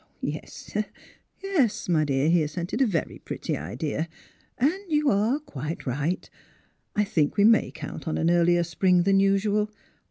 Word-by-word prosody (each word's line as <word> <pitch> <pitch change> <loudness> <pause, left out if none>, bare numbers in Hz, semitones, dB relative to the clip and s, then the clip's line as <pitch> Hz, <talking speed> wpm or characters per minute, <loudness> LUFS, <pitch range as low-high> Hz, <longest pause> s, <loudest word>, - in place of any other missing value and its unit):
*' - - -39
Yes, - - -6 0.7
yes; 260 - +1
my 160 -4 +3
dear," 135 0 +1
he 170 0 +4
assented, 170 - -2
''"a 265 - +5
very 170 -7 -2
pretty - - -4
idea; 140 - -3 0.5
and 280 +6 +3 0.2
you 300 -2 +3
are 215 +7 +2
quite 155 - -6
right; 145 +7 -2 0.7
I 210 - +3
think' 160 -7 0
we 200 - +5
may 225 +1 +5
count - - -8
on 160 - -1
an 165 +1 +2
earlier 175 0 +4
spring 175 +2 +2
than 195 +1 +4
usual. 200 +2 +2
180 Hz, 160 wpm, -26 LUFS, 155-210 Hz, 0.7 s, a